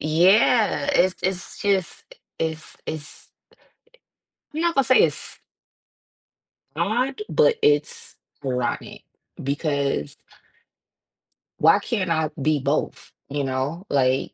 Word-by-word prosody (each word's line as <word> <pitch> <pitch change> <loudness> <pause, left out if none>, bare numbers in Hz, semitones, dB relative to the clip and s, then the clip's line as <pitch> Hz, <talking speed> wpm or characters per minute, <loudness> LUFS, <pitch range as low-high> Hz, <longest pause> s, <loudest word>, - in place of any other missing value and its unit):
Yeah, 200 - +3
it's 185 +1 +3
it's 185 -1 -3
just 195 -3 0 0.3
it's 160 -1 -4
it's 155 -1 -7 1.3
I - - -6
I'm - - 0
not 340 -1 +1
gonna 275 - +4
say 255 +2 +5
it's - - -2 1.4
Odd, 255 - -1
but 475 - +3
it's 145 0 +1 0.3
rotten 125 -3 -3 0.4
because 140 - -1 1.4
Why 165 +6 +5
can't 205 -4 -2
I 160 -2 +1
be 150 +1 +2
both, 140 +3 -2 0.2
you 145 0 -2
know, 135 +7 -3
like 130 -1 +1
160 Hz, 105 wpm, -23 LUFS, 140-200 Hz, 1.4 s, say